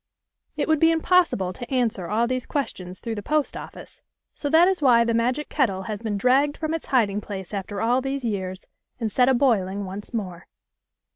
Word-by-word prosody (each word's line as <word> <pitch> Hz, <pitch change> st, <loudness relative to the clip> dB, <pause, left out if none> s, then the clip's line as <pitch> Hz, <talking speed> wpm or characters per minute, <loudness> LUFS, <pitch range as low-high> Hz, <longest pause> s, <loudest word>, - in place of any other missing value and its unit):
It -, -, 0 dB
would 315 Hz, -2 st, +3 dB
be 325 Hz, -, +5 dB
impossible 325 Hz, -, +2 dB
to 240 Hz, +7 st, -9 dB
answer 230 Hz, -8 st, 0 dB
all 225 Hz, +3 st, +1 dB
these 255 Hz, 0 st, -3 dB
ques 285 Hz, -2 st, -1 dB
tions 180 Hz, 0 st, -9 dB
through 230 Hz, -, -5 dB
the 210 Hz, -, -5 dB
post 300 Hz, +6 st, 0 dB
office, -, -, -10 dB, 0.3 s
so 290 Hz, -, -4 dB
that 325 Hz, +4 st, +6 dB
is 380 Hz, -3 st, 0 dB
why 240 Hz, -4 st, +5 dB
the 230 Hz, 0 st, 0 dB
magic 250 Hz, +6 st, 0 dB
kettle 195 Hz, -10 st, 0 dB
has 210 Hz, -1 st, -5 dB
been 215 Hz, -3 st, -2 dB
dragged 270 Hz, +6 st, +2 dB
from 315 Hz, 0 st, -2 dB
its 325 Hz, -, -4 dB
hiding 210 Hz, -6 st, +2 dB
place 195 Hz, -2 st, -7 dB
after 200 Hz, 0 st, -4 dB
all 245 Hz, +3 st, +2 dB
these 270 Hz, -1 st, -3 dB
years, 190 Hz, -4 st, -3 dB, 0.3 s
and 225 Hz, -3 st, -2 dB
set 250 Hz, +4 st, +3 dB
a 265 Hz, -, +4 dB
boiling 205 Hz, -7 st, +1 dB
once 195 Hz, +2 st, -7 dB
more. 185 Hz, -7 st, -5 dB
235 Hz, 205 wpm, -24 LUFS, 200-275 Hz, 0.3 s, that